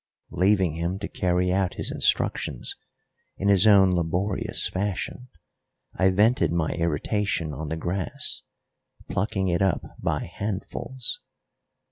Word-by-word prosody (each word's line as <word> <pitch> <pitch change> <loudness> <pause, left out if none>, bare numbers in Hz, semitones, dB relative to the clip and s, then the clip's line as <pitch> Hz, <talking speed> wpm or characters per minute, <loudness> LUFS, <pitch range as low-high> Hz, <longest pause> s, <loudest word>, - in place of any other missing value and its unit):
Leaving 95 -3 +3
him 85 +3 -2
to - - -4
carry 90 0 +1
out 95 -1 0
his - - -3
instructions - - 0 0.6
in 100 - 0
his 100 +1 +5
own 100 -3 +7
laborious 90 +3 0
fashion, 100 +5 -3 0.7
I 95 0 +3
vented 110 - +3
my 85 -2 0
irritation 85 +1 -1
on 75 +2 -5
the 80 - -2
grass, 90 +2 -3 0.7
plucking 95 0 0
it 85 0 +1
up 95 -4 +2 0.2
by - - 0
handfuls. 115 +5 -4
95 Hz, 120 wpm, -25 LUFS, 85-100 Hz, 0.7 s, own